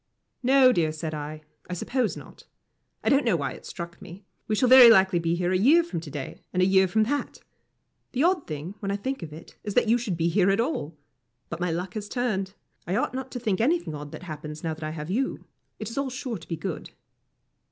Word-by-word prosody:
"No, 260 0 +6
dear," 165 -7 +1
said 155 0 -5
I, 155 +1 -6 0.3
"I - - -3
suppose 250 +6 -1
not. - - -13 0.6
I - - +2
don't 275 +1 +4
know 230 -6 +2
why 140 -4 -2
it - - -10
struck 170 0 -8
me. 190 +1 -11 0.2
We 215 - +1
shall 250 - +3
very 255 -1 +10
likely 190 -5 +5
be 165 0 0
here 175 +1 0
a - - +2
year 305 - +6
from 335 - -4
to 160 -2 -9
day, 140 -1 -7
and 180 - -1
a 185 - +5
year 190 0 +4
from 215 +4 +2
that. 285 +6 -2 0.8
The 265 +3 +1
odd 355 -2 +2
thing, 155 +4 -5
when 200 - -4
I 200 - 0
think 260 +5 -3
of 160 -3 -7
it, 155 +2 -12
is 205 -2 -5
that 245 - +4
you 235 +2 +4
should 205 -8 -3
be 165 0 +1
here 185 +2 +3
at 195 +2 +2
all. 165 - -2 0.5
But 170 - -5
my 180 0 0
luck 180 +3 -3
has 210 -2 -5
turned. 200 -6 -2 0.3
I 180 - 0
ought - - 0
not 260 0 -4
to 250 - -3
think 215 -4 0
anything 315 - +1
odd 145 0 -7
that - - -9
happens 150 -2 -7
now 160 -1 -1
that 155 0 -9
I 155 - -2
have 155 +1 -5
you. 265 +6 -1 0.3
It - - -6
is 250 - -3
all 275 -1 -1
sure 250 -4 -5
to 165 - -14
be 165 - -3
good." 175 -1 -5
190 Hz, 245 wpm, -26 LUFS, 165-245 Hz, 0.8 s, very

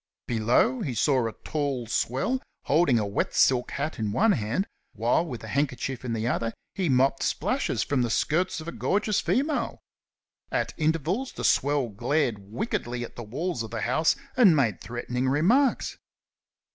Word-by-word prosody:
Below 125 - +2
he 135 - -3
saw 130 +2 +2
a - - -3
tall 140 -5 -2
swell 135 - 0 0.2
holding 145 -5 +3
a 105 - +1
wet 100 0 -2
silk 125 -2 +3
hat 145 0 -3
in 105 -2 -1
one 215 - +3
hand, 120 - 0 0.3
while 115 +7 +2
with 125 -10 -7
a - - -7
handkerchief 135 -1 -1
in 120 -2 -2
the 115 0 -1
other 115 -2 -1 0.2
he 185 -5 -1
mopped 135 +1 +3
splashes - - 0
from 140 -3 0
the 120 - 0
skirts 165 +10 +1
of 160 - -9
a - - -3
gorgeous 205 +2 0
female. 285 +3 0 0.7
At - - -1
intervals 165 - 0
the - - -6
swell 140 -3 +2
glared 120 +2 0
wickedly 120 - -3
at 120 - -9
the - - -6
walls 140 +7 -3
of 115 - -5
the 115 0 -4
house 145 +8 +2 0.2
and 215 -10 +6
made 115 -10 +1
threatening 125 +2 -2
remarks. 225 - +2
135 Hz, 170 wpm, -27 LUFS, 115-165 Hz, 0.7 s, and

